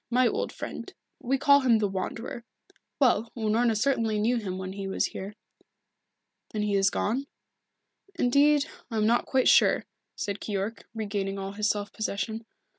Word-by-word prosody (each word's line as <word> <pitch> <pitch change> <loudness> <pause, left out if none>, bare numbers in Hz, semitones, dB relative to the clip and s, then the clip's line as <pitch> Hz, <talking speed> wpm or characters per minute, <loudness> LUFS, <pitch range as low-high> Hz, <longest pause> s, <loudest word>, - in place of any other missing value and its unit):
My 250 +1 +4
old - - -1
friend. - - -7 0.3
We 265 +3 0
call 280 +1 +6
him 250 -4 +4
the 210 -1 +1
Wanderer. 210 +5 -5 0.6
Well, 235 -4 +3
Unorna 225 +1 +2
certainly 225 -3 +1
knew 235 +4 +2
him 190 -5 -4
when 190 0 -5
he 195 0 -5
was 190 - 0
here." 200 +2 -6 1.1
"Then 210 -1 -2
he 210 -1 0
is 195 -1 +4
gone?" 255 +10 -1 0.9
"Indeed, 285 +3 +4 0.2
I 225 - -3
am 215 - +2
not 235 +2 +2
quite 265 -1 +2
sure," - - +5 0.3
said 200 -1 -3
Keyork, 205 +2 -3
regaining 200 -2 -2
all 195 0 -4
his 210 +1 0
self 205 0 -2
possession. 220 +1 -3
220 Hz, 160 wpm, -27 LUFS, 200-240 Hz, 1.1 s, call